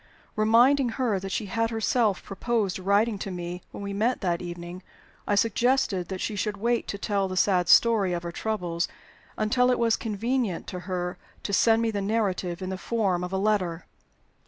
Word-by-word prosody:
Reminding 240 Hz, +5 st, +4 dB
her 235 Hz, -7 st, +1 dB
that 195 Hz, 0 st, -6 dB
she 215 Hz, -, -2 dB
had 225 Hz, +3 st, -1 dB
herself 225 Hz, -2 st, +1 dB
proposed 205 Hz, -1 st, -1 dB
writing 200 Hz, +3 st, +2 dB
to 195 Hz, -, -4 dB
me 180 Hz, -1 st, -5 dB
when -, -, -8 dB
we 200 Hz, 0 st, -4 dB
met 225 Hz, +5 st, 0 dB
that 175 Hz, -3 st, 0 dB
evening, 175 Hz, +1 st, -7 dB, 0.5 s
I 205 Hz, -, +2 dB
suggested 225 Hz, -3 st, +1 dB
that 190 Hz, 0 st, -5 dB
she 215 Hz, -, -2 dB
should 205 Hz, +1 st, -2 dB
wait 235 Hz, +3 st, 0 dB
to 200 Hz, -, -4 dB
tell 200 Hz, -1 st, 0 dB
the 185 Hz, 0 st, -5 dB
sad 180 Hz, -2 st, +2 dB
story 220 Hz, -5 st, +5 dB
of 170 Hz, 0 st, -3 dB
her 170 Hz, -, -4 dB
troubles 175 Hz, -4 st, -2 dB, 0.5 s
until 250 Hz, +4 st, +2 dB
it 250 Hz, -, +3 dB
was 230 Hz, -1 st, +3 dB
convenient 225 Hz, -2 st, -2 dB
to 180 Hz, -, -5 dB
her 180 Hz, -1 st, -3 dB, 0.2 s
to 200 Hz, -, -3 dB
send 225 Hz, +3 st, +4 dB
me 225 Hz, -, +1 dB
the 205 Hz, -2 st, -2 dB
narrative 195 Hz, -4 st, -1 dB
in 185 Hz, -, -4 dB
the 190 Hz, -, -4 dB
form 195 Hz, -7 st, 0 dB
of 180 Hz, -, -4 dB
a 190 Hz, -, -1 dB
letter. 190 Hz, -5 st, 0 dB
200 Hz, 190 wpm, -26 LUFS, 185-225 Hz, 0.5 s, story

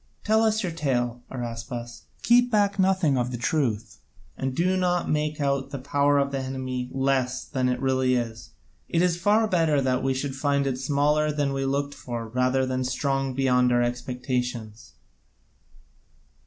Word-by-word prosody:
Tell 220 Hz, +1 st, +3 dB
us 220 Hz, -1 st, +2 dB
your 180 Hz, -, -2 dB
tale, 125 Hz, -6 st, -1 dB
Araspas, 120 Hz, -1 st, -6 dB, 0.2 s
keep 245 Hz, +1 st, +5 dB
back 205 Hz, -3 st, +1 dB
nothing 185 Hz, -8 st, +3 dB
of 120 Hz, 0 st, -1 dB
the 125 Hz, -, -4 dB
truth, 120 Hz, -4 st, -1 dB, 0.4 s
and 130 Hz, -1 st, -3 dB
do 185 Hz, +4 st, +2 dB
not 180 Hz, -1 st, +1 dB
make 150 Hz, 0 st, -1 dB
out 140 Hz, -1 st, 0 dB
the 140 Hz, -, -5 dB
power 140 Hz, +2 st, +2 dB
of 140 Hz, 0 st, +1 dB
the 135 Hz, -, -2 dB
enemy 130 Hz, -1 st, -4 dB
less 130 Hz, -1 st, 0 dB
than 130 Hz, -3 st, -1 dB
it 125 Hz, 0 st, -1 dB
really 130 Hz, -1 st, +2 dB
is. 115 Hz, -2 st, -4 dB, 0.4 s
It 170 Hz, +1 st, +2 dB
is 175 Hz, -1 st, +1 dB
far 215 Hz, +4 st, +3 dB
better 165 Hz, -6 st, +2 dB
that 130 Hz, -1 st, +1 dB
we 135 Hz, 0 st, 0 dB
should 135 Hz, 0 st, -3 dB
find 140 Hz, 0 st, +1 dB
it 130 Hz, -2 st, -1 dB
smaller 150 Hz, +3 st, +2 dB
than 145 Hz, -2 st, -1 dB
we 135 Hz, 0 st, -1 dB
looked 140 Hz, +1 st, -1 dB
for 120 Hz, -4 st, -6 dB
rather 130 Hz, +2 st, +1 dB
than 130 Hz, 0 st, -1 dB
strong 135 Hz, 0 st, -1 dB
beyond 125 Hz, -2 st, +3 dB
our 120 Hz, 0 st, +3 dB
expectations." 125 Hz, -2 st, -4 dB
135 Hz, 170 wpm, -25 LUFS, 125-150 Hz, 0.4 s, keep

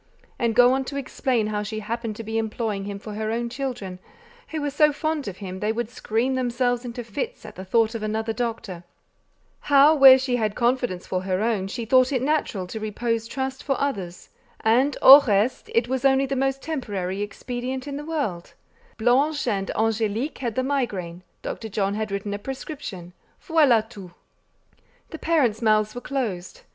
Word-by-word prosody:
and 235 Hz, -2 st, 0 dB
go 245 Hz, +2 st, +6 dB
on 265 Hz, 0 st, 0 dB
to 275 Hz, -, -7 dB
explain 260 Hz, -4 st, -1 dB
how 210 Hz, -1 st, -2 dB
she 215 Hz, +1 st, -4 dB
happened 225 Hz, +1 st, -4 dB
to 225 Hz, -, -7 dB
be 220 Hz, +1 st, -2 dB
employing 215 Hz, -2 st, -3 dB
him 200 Hz, -1 st, -5 dB
for 210 Hz, +1 st, -8 dB
her 215 Hz, +1 st, -3 dB
own 235 Hz, +1 st, -1 dB
children, 235 Hz, -9 st, -5 dB, 0.5 s
who 320 Hz, -, -4 dB
were 290 Hz, -1 st, -2 dB
so 300 Hz, +1 st, +4 dB
fond 310 Hz, -2 st, -2 dB
of 190 Hz, -2 st, -6 dB
him 190 Hz, -2 st, -7 dB
they 210 Hz, +2 st, 0 dB
would 235 Hz, 0 st, -3 dB
scream 245 Hz, +2 st, -1 dB
themselves 245 Hz, -1 st, 0 dB
into 245 Hz, 0 st, -6 dB
fits 450 Hz, -, -5 dB
at -, -, -9 dB
the 190 Hz, -, -7 dB
thought 225 Hz, +3 st, +2 dB
of 230 Hz, -, -4 dB
another 220 Hz, +1 st, -2 dB
doctor; 220 Hz, -6 st, -4 dB, 0.8 s
how, 285 Hz, +2 st, +5 dB
where 270 Hz, -3 st, +9 dB
she 255 Hz, -1 st, -1 dB
had 215 Hz, -3 st, -1 dB
confidence 240 Hz, -6 st, 0 dB
for 185 Hz, -, -2 dB
her 185 Hz, +1 st, -1 dB
own, 215 Hz, -5 st, 0 dB
she 230 Hz, +4 st, -5 dB
thought 255 Hz, +3 st, +4 dB
it 260 Hz, -3 st, 0 dB
natural 275 Hz, -10 st, 0 dB
to 220 Hz, +5 st, -6 dB
repose 225 Hz, +1 st, -2 dB
trust 265 Hz, +1 st, -4 dB
for 275 Hz, -2 st, -1 dB
others, 195 Hz, -11 st, -3 dB, 0.3 s
and 255 Hz, +6 st, +2 dB
au 275 Hz, +2 st, +11 dB
reste, 210 Hz, +4 st, +1 dB
it 230 Hz, +1 st, +3 dB
was 260 Hz, +1 st, -2 dB
only 270 Hz, 0 st, +4 dB
the 275 Hz, 0 st, -2 dB
most 270 Hz, 0 st, -1 dB
temporary 205 Hz, -, -3 dB
expedient 250 Hz, +5 st, -5 dB
in 280 Hz, -, -4 dB
the 295 Hz, -, -6 dB
world; 280 Hz, -, -3 dB, 0.4 s
Blanche 265 Hz, +6 st, +2 dB
and 195 Hz, -4 st, -1 dB
Angélique 225 Hz, +4 st, -1 dB
had 235 Hz, -4 st, -3 dB
the 260 Hz, -, 0 dB
migraine; 205 Hz, -11 st, -2 dB, 0.2 s
Dr. 220 Hz, -, -5 dB
John 200 Hz, -1 st, -1 dB
had 215 Hz, +1 st, -3 dB
written 200 Hz, +1 st, -3 dB
a 205 Hz, -, -4 dB
prescription; 255 Hz, -, -7 dB, 0.3 s
voilà 265 Hz, -9 st, +4 dB
tout! 195 Hz, -6 st, -11 dB, 1.0 s
The 320 Hz, -, -7 dB
parents' 265 Hz, -10 st, +1 dB
mouths 215 Hz, -1 st, +2 dB
were 245 Hz, -, -6 dB
closed. 230 Hz, -11 st, -4 dB
235 Hz, 185 wpm, -24 LUFS, 210-265 Hz, 1.0 s, au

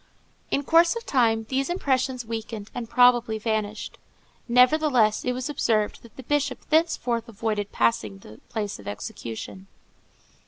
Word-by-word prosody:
In 280 Hz, -, 0 dB
course 335 Hz, -, +4 dB
of 465 Hz, -, -6 dB
time 225 Hz, -4 st, +2 dB
these 270 Hz, +2 st, 0 dB
impressions 260 Hz, -7 st, 0 dB
weakened 220 Hz, -2 st, -6 dB
and 235 Hz, -2 st, -5 dB
probably 245 Hz, -3 st, +4 dB
vanished. 215 Hz, -1 st, -3 dB, 0.5 s
Nevertheless, 250 Hz, -3 st, +4 dB
it 250 Hz, -, 0 dB
was 255 Hz, 0 st, -4 dB
observed 225 Hz, -7 st, 0 dB
that 235 Hz, -, -17 dB
the 260 Hz, -, -10 dB
Bishop 285 Hz, 0 st, -1 dB
thenceforth 255 Hz, -8 st, +1 dB
avoided 210 Hz, -2 st, -3 dB
passing 110 Hz, -4 st, 0 dB
the 105 Hz, +2 st, -14 dB
place 210 Hz, -, -4 dB
of 100 Hz, -, -12 dB
execution. 115 Hz, -, -7 dB
235 Hz, 135 wpm, -25 LUFS, 215-265 Hz, 0.5 s, course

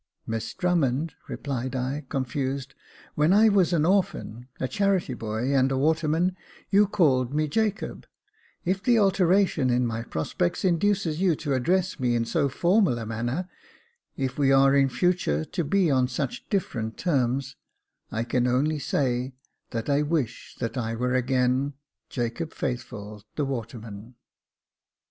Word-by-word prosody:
" -, -, -51 dB
Miss 115 Hz, -1 st, -4 dB
Drummond," 160 Hz, -4 st, +1 dB
replied 130 Hz, -2 st, -4 dB
I, 135 Hz, +3 st, -3 dB
confused, 135 Hz, +1 st, -2 dB, 0.2 s
" -, -, -24 dB
when 150 Hz, +3 st, +3 dB
I 215 Hz, +3 st, +6 dB
was 195 Hz, -4 st, +3 dB
an 160 Hz, -3 st, +2 dB
orphan, 180 Hz, -, 0 dB
a 130 Hz, -, -1 dB
charity 195 Hz, -5 st, +1 dB
boy, 115 Hz, +3 st, -2 dB
and 135 Hz, 0 st, +3 dB
a 135 Hz, -, 0 dB
waterman, 160 Hz, +4 st, +1 dB, 0.4 s
you 205 Hz, +1 st, +5 dB
called 135 Hz, -9 st, +2 dB
me 155 Hz, 0 st, +1 dB
Jacob: 210 Hz, +6 st, -2 dB, 0.6 s
if 185 Hz, +2 st, 0 dB
the 240 Hz, +3 st, +3 dB
alteration 190 Hz, -7 st, +3 dB
in 125 Hz, 0 st, +2 dB
my 115 Hz, -1 st, -2 dB
prospects 85 Hz, -, -2 dB
induces 180 Hz, -2 st, +1 dB
you 180 Hz, -4 st, +3 dB
to 145 Hz, -1 st, -2 dB
address 175 Hz, +7 st, +1 dB
me 125 Hz, -2 st, +1 dB
in 115 Hz, 0 st, +1 dB
so 140 Hz, +4 st, +1 dB
formal 175 Hz, -, +2 dB
a 115 Hz, -, -5 dB
manner 120 Hz, +10 st, -3 dB, 0.4 s
— 475 Hz, 0 st, -42 dB
if 130 Hz, +2 st, -5 dB
we 135 Hz, -1 st, +4 dB
are 135 Hz, 0 st, +5 dB
in 135 Hz, -1 st, +4 dB
future 130 Hz, -, +1 dB
to 170 Hz, -, -3 dB
be 175 Hz, +2 st, +2 dB
on 130 Hz, -2 st, +3 dB
such 190 Hz, -, -4 dB
different 115 Hz, -, -2 dB
terms 135 Hz, -4 st, 0 dB, 0.3 s
— -, -, -48 dB
I 115 Hz, -, -1 dB
can 125 Hz, +1 st, 0 dB
only 145 Hz, +5 st, +1 dB
say, 130 Hz, -2 st, -1 dB, 0.4 s
that 115 Hz, -2 st, -4 dB
I 145 Hz, 0 st, +2 dB
wish 150 Hz, -6 st, -2 dB
that 115 Hz, +2 st, -3 dB
I 115 Hz, -1 st, -2 dB
were 125 Hz, +2 st, -1 dB
again 130 Hz, +2 st, +1 dB, 0.2 s
— -, -, -59 dB
^Jacob 120 Hz, +6 st, -3 dB
Faithful, 105 Hz, -5 st, -5 dB
the 150 Hz, -, 0 dB
waterman." 115 Hz, -3 st, -6 dB
135 Hz, 160 wpm, -26 LUFS, 125-175 Hz, 0.6 s, I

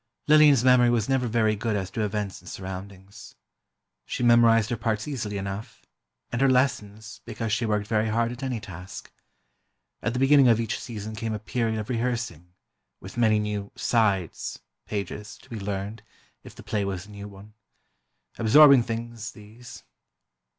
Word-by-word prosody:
Lillian's 150 Hz, -4 st, +6 dB
memory 125 Hz, -1 st, +5 dB
was 115 Hz, -3 st, +1 dB
never 130 Hz, -2 st, +1 dB
very 110 Hz, -1 st, +2 dB
good 110 Hz, +1 st, -2 dB
as 95 Hz, -2 st, -3 dB
to 115 Hz, -, -3 dB
events 105 Hz, -1 st, -3 dB
and -, -, -12 dB
surroundings. 95 Hz, +1 st, -9 dB, 0.7 s
She -, -, -3 dB
memorized 115 Hz, -1 st, +5 dB
her -, -, +1 dB
parts 110 Hz, 0 st, -2 dB
easily 110 Hz, -8 st, -4 dB
enough, 100 Hz, +2 st, -6 dB, 0.5 s
and 115 Hz, -, -2 dB
her 135 Hz, -, +5 dB
lessons, 110 Hz, -4 st, -1 dB
because 115 Hz, -2 st, -4 dB
she 115 Hz, 0 st, 0 dB
worked 105 Hz, -1 st, 0 dB
very 110 Hz, 0 st, 0 dB
hard 115 Hz, +2 st, 0 dB
at 125 Hz, -, -8 dB
any 130 Hz, -3 st, -2 dB
task. 95 Hz, -2 st, -10 dB, 0.9 s
At 115 Hz, -, -1 dB
the 125 Hz, -, -2 dB
beginning 135 Hz, 0 st, +6 dB
of 115 Hz, -2 st, +4 dB
each 115 Hz, -, -2 dB
season 110 Hz, -2 st, -7 dB
came 110 Hz, 0 st, -3 dB
a -, -, -5 dB
period 110 Hz, +1 st, -2 dB
of 105 Hz, -, -5 dB
rehearsing—with 115 Hz, -6 st, -6 dB
many 110 Hz, -3 st, +3 dB
new 105 Hz, -1 st, -3 dB
"sides" 100 Hz, -8 st, 0 dB, 0.3 s
(pages) 105 Hz, 0 st, -5 dB
to -, -, -21 dB
be 115 Hz, -, -5 dB
learned, 100 Hz, +2 st, -4 dB, 0.4 s
if -, -, -13 dB
the -, -, -12 dB
play 105 Hz, -2 st, -1 dB
was 95 Hz, -1 st, -4 dB
a 105 Hz, -, -15 dB
new 100 Hz, 0 st, -8 dB
one. 100 Hz, +1 st, -14 dB, 0.9 s
Absorbing 140 Hz, +4 st, +7 dB
things, 115 Hz, -1 st, -5 dB
these. 110 Hz, +3 st, -13 dB
110 Hz, 165 wpm, -26 LUFS, 100-120 Hz, 0.9 s, Absorbing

